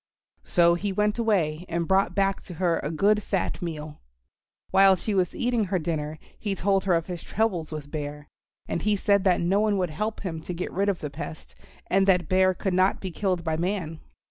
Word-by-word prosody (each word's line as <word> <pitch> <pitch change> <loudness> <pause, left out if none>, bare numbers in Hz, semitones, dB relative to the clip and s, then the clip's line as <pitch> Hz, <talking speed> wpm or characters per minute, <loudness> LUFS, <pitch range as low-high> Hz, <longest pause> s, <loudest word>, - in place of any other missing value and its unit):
So 170 -1 +4
he 195 +4 -2
went 210 +3 0
away 175 -8 +1
and 170 0 -1
brought 190 -2 +2
back 195 -1 +1
to 180 - -9
her 170 -1 +1
a 145 - -3
good 205 +7 +2
fat 195 -1 -2
meal. 155 -3 -6 0.7
While 195 0 +6
she 210 +3 -3
was 185 -3 +1
eating 240 -3 +1
her 190 0 0
dinner 155 -2 -3 0.2
he 200 -2 -2
told 195 +1 +1
her 185 -3 +3
of 165 -1 0
his 175 -3 -6
troubles 190 -7 -1
with 150 -2 -7
Bear, 150 -1 -5 0.4
and - - -2
he 210 0 +2
said 200 0 +2
that 180 -2 +3
no 185 +4 +2
one 210 -1 +2
would 180 -4 -1
help 210 +8 -3
him 165 -5 -4
to 175 +2 -6
get 180 - -4
rid 200 +3 +1
of 195 - -2
the 150 - -4
pest, 160 +2 -8 0.3
and 195 +1 +2
that 180 -4 +3
Bear 185 +1 +3
could 190 +1 -2
not 185 +1 +3
be 190 - -5
killed 185 -1 -1
by 160 -1 -1
man. 170 -3 -2
185 Hz, 215 wpm, -26 LUFS, 165-195 Hz, 0.7 s, While